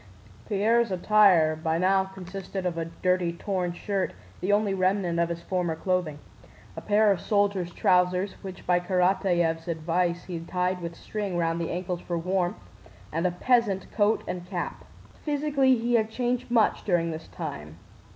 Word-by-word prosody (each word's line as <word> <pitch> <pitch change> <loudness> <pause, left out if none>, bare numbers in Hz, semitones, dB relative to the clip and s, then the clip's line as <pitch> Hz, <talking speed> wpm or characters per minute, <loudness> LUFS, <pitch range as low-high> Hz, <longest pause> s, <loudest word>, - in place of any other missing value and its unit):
Pierre's 225 +3 +2
attire 185 -4 +4
by 160 +1 -1
now 190 +2 +3
consisted 190 0 -7
of 175 -2 -1
a 165 0 -2
dirty 180 +1 0
torn 180 0 -2
shirt 195 +1 -2 0.3
(the 185 +3 0
only 205 -1 +2
remnant 185 -2 +1
of 170 0 +2
his 170 0 -5
former 180 -3 -1
clothing), 175 -3 -1 0.6
a - - -6
pair 210 0 +4
of 190 - 0
soldier's 200 -4 +1
trousers 180 +2 +2
which 190 -2 -9
by 180 0 +3
Karatáev's 180 -2 +1
advice 170 +1 -1
he 175 -3 -5
tied 180 +2 -2
with 170 0 -5
string 200 -3 -4
round 165 0 0
the 165 - -2
ankles 180 0 -3
for 175 - -3
warmth, 180 +1 -1 0.5
and 165 +3 +1
a - - -1
peasant 200 0 +1
coat 210 +1 +2
and 180 -1 -5
cap. 180 -3 -4 0.4
Physically 285 -3 +2
he 240 +1 -1
had 220 -2 +3
changed 245 +1 -2
much 230 -3 +2
during 170 -4 +1
this 160 0 -7
time. 75 +2 -7
180 Hz, 160 wpm, -27 LUFS, 170-200 Hz, 0.6 s, attire